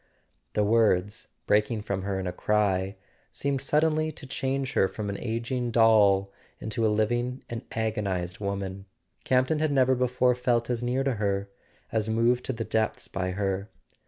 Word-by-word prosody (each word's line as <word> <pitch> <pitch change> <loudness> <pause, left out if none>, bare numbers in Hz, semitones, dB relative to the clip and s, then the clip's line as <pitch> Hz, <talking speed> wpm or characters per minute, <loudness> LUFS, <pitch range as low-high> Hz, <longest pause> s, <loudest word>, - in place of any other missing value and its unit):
The 105 - +2
words, 105 -1 +2 0.2
breaking 105 +1 +2
from 100 -2 -2
her 95 0 -2
in 95 - -4
a 90 - -1
cry, 100 -2 +1 0.4
seemed 140 -1 -1
sud¬ 150 +3 +2
denly 155 0 +1
to - - -10
change 135 0 -2
her 95 - +3
from 105 +1 -5
an 100 - -4
ageing 120 +1 -2
doll 105 -4 +4 0.3
into 110 +1 -3
a - - +4
living 120 +4 0
and 115 -1 -4
agonized 100 -5 -2
woman. 100 -1 -4 0.4
Campton 130 +4 +2
had 155 -1 +1
never 130 -2 +4
before 125 0 +2
felt 120 -1 0
as 120 -1 -1
near 125 +2 0
to 135 -4 0
her, 100 -1 -1 0.4
as 110 -1 0
moved 120 +3 +2
to - - -1
the 115 -1 -3
depths 110 -1 -1
by 95 -1 -3
her. 100 +1 -2
110 Hz, 170 wpm, -27 LUFS, 100-125 Hz, 0.4 s, doll